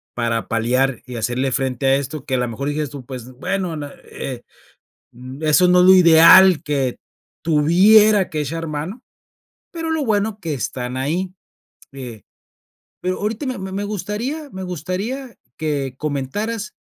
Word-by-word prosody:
para 115 -1 -1
paliar, 125 +3 0
y 125 -1 -8
hacerle 125 +4 -1
frente 130 +1 -1
a 135 - +5
esto, 140 +1 -5
que 130 - -1
a - - +1
lo 125 0 -1
mejor 135 +5 -4
digas 150 0 -2
tú: 140 -2 -8
"Pues, 130 -1 -8
bueno, 180 +6 -3 0.3
eh, 130 -3 -7 0.7
n 130 +5 -8
eso 180 +4 +5
no 180 0 +5
es - - +5
lo 190 - +8
ideal, 180 +1 +7
que 135 -4 -1 0.5
tuviera 190 +6 +5
que 155 -2 -2
echar 165 +3 -4
mano", 160 - -5 0.7
pero 330 -2 -4
lo 315 -3 -1
bueno 215 -1 0
que 165 -4 -3
están 125 0 -4
ahí 175 +8 -2 0.6
Eh, 125 -5 -9 0.8
pero 185 0 -2
ahorita 215 +6 -3
me 255 -1 -3
me 200 +1 -3
gustaría 215 - -4
me 190 - -7
gustaría 185 - -5 0.2
que 145 -4 -2
comentaras, 200 - -3
155 Hz, 155 wpm, -20 LUFS, 130-200 Hz, 0.8 s, lo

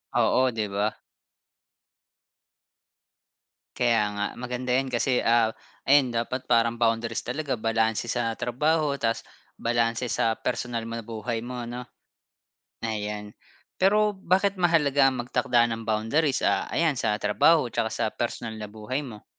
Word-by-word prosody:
Oo, 130 0 +3
'di 110 -3 -2
ba? 105 +2 -1 2.7
Kaya 115 -3 +2
nga, 105 0 -1
maganda 125 0 -2
'yan, 135 0 0
kasi, 125 +1 +1
ah, 115 -1 +4 0.4
ayun 135 -2 +5
dapat 120 +2 -2
parang 115 -1 +2
boundaries 115 0 0
talaga 140 +1 -2
balanse 115 0 0
sa 115 -2 -1
trabaho 145 +4 0
tapos 115 -1 0 0.3
balanse 115 +1 0
sa 115 0 +1
personal 120 0 -3
na 115 +1 -5
buhay 115 +1 -4
mo 120 +1 -6
'no. 120 +1 -6 1.0
Ayan. 105 -1 -4 0.5
Pero 210 +2 +4
bakit 190 +1 +1
mahalaga 145 -5 +4
ang 130 - -4
magtakda 120 -1 +2
ng 115 - -5
boundaries, 115 +7 0
ah, - - +1
ayan 165 -2 +2
sa 110 -5 0
trabaho 120 +7 +3
tsaka 115 -1 0
sa 115 +1 -1
personal 120 -1 -3
na 105 - -6
buhay 110 +6 -4
mo? 115 -7 -10
120 Hz, 135 wpm, -26 LUFS, 115-130 Hz, 2.7 s, ayun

